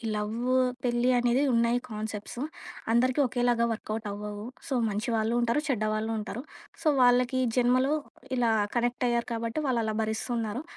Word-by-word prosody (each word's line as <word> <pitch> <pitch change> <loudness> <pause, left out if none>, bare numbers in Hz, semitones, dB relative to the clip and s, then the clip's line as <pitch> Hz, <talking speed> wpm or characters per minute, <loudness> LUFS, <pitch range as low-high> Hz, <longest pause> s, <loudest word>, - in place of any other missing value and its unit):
Love, 225 +4 -1 0.3
పెళ్లి 240 0 +2
అనేది 245 +2 +2
ఉన్నాయి 235 +1 +3
కాన్సెప్ట్సు. 215 +3 -5 0.5
అందరికి 255 +4 +3
ఒకేలాగా 245 -1 +2
వర్క‌వుటవ్వవు. 210 -1 -5 0.2
సో 270 - -2 0.2
మంచి 215 +4 -2
వాళ్ళు 220 +1 +1
ఉంటారు, 235 +4 +2
చెడ్డ 235 -6 0
వాళ్ళు 220 +1 -1
ఉంటారు. 225 +3 -5 0.4
సో - - +1
వాళ్ళకి 250 +1 +4 0.2
జన్మలో 255 +3 +3 0.5
ఇలా 235 -2 +3 0.2
కనెక్ట్ 245 +1 +1
అయ్యారు 235 0 0
కాబట్టి, 230 +5 -2
వాళ్ళలా 230 -4 0
భరిస్తున్నారు. 225 +3 -2
235 Hz, 135 wpm, -28 LUFS, 220-245 Hz, 0.5 s, వాళ్ళకి